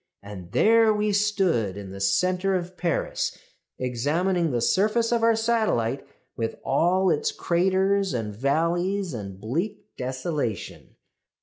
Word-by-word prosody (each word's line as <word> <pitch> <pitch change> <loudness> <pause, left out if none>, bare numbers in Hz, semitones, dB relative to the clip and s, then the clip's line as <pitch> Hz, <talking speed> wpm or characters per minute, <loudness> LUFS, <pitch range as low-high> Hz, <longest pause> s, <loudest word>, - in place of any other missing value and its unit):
And 100 -3 -9
there 225 - +5
we 210 0 0
stood 190 - +1
in 100 -2 -8
the 95 0 -8
centre 180 - +1
of 180 0 -4
Paris, 175 -3 -2 0.4
examining 160 +8 0
the 125 -4 0
surface 215 - +2
of 235 -1 +2
our 230 0 +4
satellite 220 - 0 0.3
with 115 -1 -3
all 180 +7 +2
its 450 0 0
craters 190 - +1
and 110 -4 -3
valleys 170 - 0
and 100 -4 -7
bleak 165 - -4
desolation. 130 - -4
175 Hz, 125 wpm, -25 LUFS, 120-200 Hz, 0.4 s, there